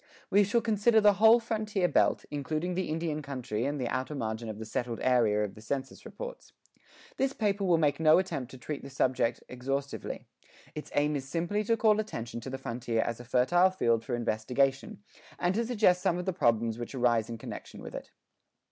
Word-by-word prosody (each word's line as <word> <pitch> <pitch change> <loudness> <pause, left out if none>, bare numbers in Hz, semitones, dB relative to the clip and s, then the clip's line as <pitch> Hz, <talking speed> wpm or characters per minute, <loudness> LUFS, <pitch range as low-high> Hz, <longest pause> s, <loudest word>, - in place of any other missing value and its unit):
We 205 +1 +6
shall 205 +4 +1
consider 220 +1 +3
the 205 -1 +6
whole 225 +2 +8
frontier 215 -5 -1
belt, - - +2
including 155 +4 -2
the 185 -1 -2
Indian 155 -1 -2
country 130 -5 -3
and 145 +1 -2
the 125 - -1
outer 130 +5 -2
margin 110 -3 -3
of 110 - -6
the 110 - -6
"settled 120 +1 -3
area" 115 -5 +3
of 105 - -4
the 110 - -13
census 135 +4 -5
reports. - - -9 0.6
This 270 0 +1
paper 205 -4 0
will 175 -3 +4
make 150 -2 +1
no 155 -1 +6
attempt 140 -9 -2
to 130 - -11
treat 140 +4 -5
the 140 - -9
subject 130 -3 0
exhaustively; 135 +3 -4 0.5
its 150 - -7
aim 150 +1 +2
is 135 -1 -4
simply 175 +7 -1
to 230 +2 +2
call 215 -2 +4
attention 120 - -4
to 125 - -7
the 135 - -4
frontier 120 -3 -2
as 115 -1 -4
a - - -8
fertile 130 +10 +3
field 115 -11 +1
for 120 - -2
investigation, 135 - -1 0.3
and 175 +1 +1
to 230 +4 0
suggest 205 -7 +3
some 180 -3 +1
of 180 - -4
the 190 - -1
problems 115 - +1
which 120 +3 -6
arise 120 -3 +2
in 115 - -5
connection - - -8
with - - -9
it. - - -7
140 Hz, 200 wpm, -29 LUFS, 120-190 Hz, 0.6 s, whole